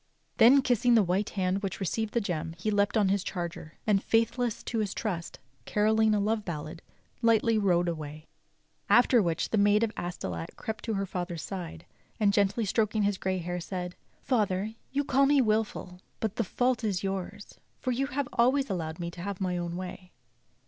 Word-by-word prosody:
Then, 265 +4 +7
kissing 245 -1 +3
the 220 - +6
white 185 +3 0
hand 190 0 -1
which 195 -3 -4
received 210 +4 -2
the 235 - +3
gem, 165 -5 -3
he 215 +5 -1
leapt 205 +2 +2
on 205 -3 +3
his 195 -1 +1
charger; 170 -3 -5
and, 205 -2 +2
faithless 230 +1 +1
to 230 - -2
his 210 -3 -2
trust, 180 -7 -3 0.3
carolling 215 +1 +3
a - - +2
love 215 +1 0
ballad, 160 -1 -6 0.4
lightly 230 -1 +3
rode 175 -3 +2
away. 155 -2 -5 0.6
After 245 -1 +6
which 170 -3 -1
the 220 - +2
Maid 205 +2 +4
of 225 - 0
Astolat 90 - -5
crept 220 0 -5
to 225 -2 -1
her 195 0 -1
father's 175 -3 -4
side, 175 -4 -6 0.3
arid 205 -2 +3
gently 205 +2 +2
stroking 215 +1 +1
his 200 -1 0
grey 190 0 -1
hair 175 0 -3
said: 180 0 -5 0.3
"Father, 210 -4 0 0.2
you 285 +1 0
call 275 0 +3
me 285 0 +4
wilful, 215 -6 -1 0.2
but 220 -1 -2
the 230 - +2
fault 245 +4 0
is 200 -3 -1
yours 195 -1 -5 0.2
for 255 - -2
you 270 +3 0
have 280 -1 -2
always 260 +1 +2
allowed 160 -3 -3
me 170 0 -4
to 170 - -9
have 200 0 -4
my 185 -2 -1
own 175 -1 -3
way. 180 0 -7
200 Hz, 190 wpm, -29 LUFS, 180-225 Hz, 0.6 s, Then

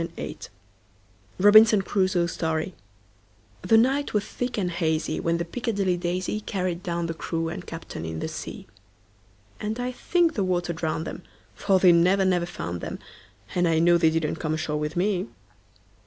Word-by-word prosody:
Carryl1841–1920 165 0 -6 0.9
Robinson 215 +1 +7
Crusoe's 185 -3 +1
Story 160 +2 -2 0.9
THE 225 +5 +4
NIGHT 265 +3 +2
was 205 - +1
thick 245 -1 -4
and 180 -4 -1
hazyWhen 165 0 0
the 170 - -2
"Piccadilly 200 -2 -1
Daisy"Carried 185 0 -2
down 170 -1 -2
the 165 - -3
crew 165 +1 -3
and 175 +2 -7
captain 165 - -7
in 80 0 -5
the - - -3
sea; - - -7 0.9
And 215 +3 -3
I 250 +1 -2
think 340 +6 +1
the 205 - 0
water 175 -2 -1
drowned 160 0 -3
'em; - - -6 0.3
For 195 -2 +2
they 185 -1 +6
never, 180 +3 +4
never 175 -2 +1
found 85 - -5
'em, - - -4 0.6
And 175 -1 +2
I 165 -1 +2
know 170 +1 +4
they 165 -1 +5
didn't 160 -1 -1
come 155 -1 -2
ashore 155 -1 -2
with 150 +1 -3
me. 185 - 0
175 Hz, 160 wpm, -25 LUFS, 165-200 Hz, 0.9 s, Robinson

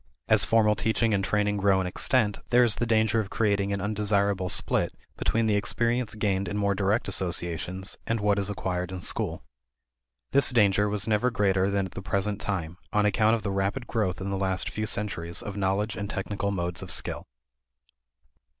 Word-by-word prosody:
As - - +4
formal 110 -2 +3
teaching 110 +1 +1
and 100 -1 +1
training 105 +1 0
grow 100 -1 +3
in 95 - -1
extent, 105 +3 +1
there 125 0 +5
is 115 -4 +2
the 120 - -1
danger 110 0 +2
of 105 -3 -3
creating 100 -3 0
an 100 - -1
undesirable 100 -2 0
split - - +2 0.2
between 115 0 0
the 105 -2 +2
experience 115 +3 0
gained 100 -2 0
in 100 - -3
more 100 -1 +1
direct 100 +3 0
associations 90 0 -2
and 115 0 0
what 105 -1 +2
is 100 0 -2
acquired 90 -3 -3
in 95 -1 -6
school. - - -1 0.9
This 140 -1 +4
danger 105 -4 +3
was 105 0 0
never 110 +3 +2
greater 100 -5 +1
than 100 -1 0
at 95 - -8
the 95 - -7
present 100 +1 -1
time, 90 -3 -3
on 105 0 +2
account 110 +2 +3
of 115 - -5
the 100 - -2
rapid 100 +6 -1
growth 105 -8 -1
in 100 +1 -4
the 100 - -1
last 95 -1 -1
few 110 0 -3
centuries 85 -6 -3
of 100 - -6
knowledge 100 +2 -1
and 100 -1 -5
technical 100 0 -3
modes 90 -3 -2
of - - -8
skill. - - -2
100 Hz, 190 wpm, -27 LUFS, 95-110 Hz, 0.9 s, there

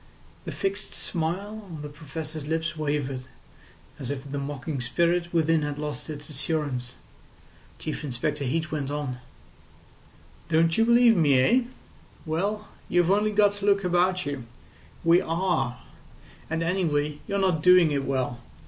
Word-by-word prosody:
The - - -4
fixed 195 +1 -3
smile 190 +6 -3
on 155 -3 -7
the - - -4
Professor's 155 0 -6
lips 160 +1 -1
wavered, 145 -4 -2 0.7
as 130 -3 -5
if 140 0 -5
the 140 - -2
mocking 140 0 -4
spirit 170 +7 +1
within 165 -1 +3
had 145 -1 -3
lost 150 +1 -4
its 150 -1 -6
assurance. 140 -4 -2 0.8
Chief 155 - -5
Inspector 145 +2 -2
Heat 155 +3 -1
went 145 -3 -2
on: 145 -4 -3 1.3
"Don't 165 0 +3
you 225 - +4
believe 235 0 +6
me 150 -7 +4
eh? 235 - +5 0.6
Well, 200 +7 -1 0.2
you've 175 0 +3
only 210 +2 +3
got 205 -1 +5
to 205 0 -5
look 200 -1 +4
about 180 +1 +2
you. 140 -4 -4 0.6
We 170 +1 +5
are. 165 -7 0 0.7
And 165 +1 -1
anyway, 150 -5 0
you're 200 - -1
not 185 -5 +2
doing 180 -2 +6
it 140 -1 0
well. 130 -3 -1
160 Hz, 145 wpm, -26 LUFS, 145-180 Hz, 1.3 s, believe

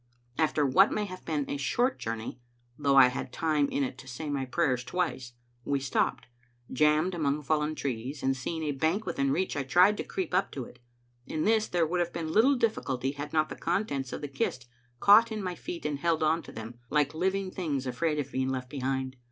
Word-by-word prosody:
After 155 -2 +2
what 185 +10 +5
may 210 - -1
have 185 -2 -9
been 150 -3 0
but - - -5
a - - -2
short 240 - 0
journey, 115 +2 -5 0.4
though 140 0 +2
I 130 -2 +8
had 125 0 -5
time 150 0 +1
in 140 - 0
it 130 -1 -4
to 130 - -12
say 145 +4 -5
my 135 -2 -1
prayers 130 -3 0
twice, 130 -3 -2 0.3
we 140 +2 0
stopped, 135 -2 0 0.5
jammed 150 +6 +3
among 150 -3 0
fallen 150 +1 0
trees; 130 +1 -4
and 135 0 +2
seeing 160 +5 -4
a 150 - 0
bank 160 +10 0
within 140 0 0
reach, 185 +7 0
I 145 - 0
tried 180 +10 +4
to - - -2
creep 185 -2 -4
up 185 -4 0
it. 125 -1 -7 0.5
In 155 - -2
this 220 0 +3
there 175 -2 +1
would 175 +3 -1
have 175 0 -1
been 160 -2 -3
little 260 +6 +5
difficulty 135 - 0
had 145 +1 -6
not 155 -1 +2
the - - -6
contents 155 -8 -1
of - - -5
the 145 - -3
kist 135 -2 -2 0.3
caught 220 +3 +7
in 215 -2 -3
my 180 -1 -2
feet 170 -2 -7
and 145 -2 -1
held 165 0 +1
on 160 +2 +2
to - - -12
them, 115 +2 -8
like 150 -1 +2
living 190 +3 -1
things 145 -8 -2
afraid 150 +5 -1
of 140 -2 -3
being 130 0 -1
left 130 -1 -4
behind. 130 -1 -2
150 Hz, 220 wpm, -29 LUFS, 135-175 Hz, 0.5 s, I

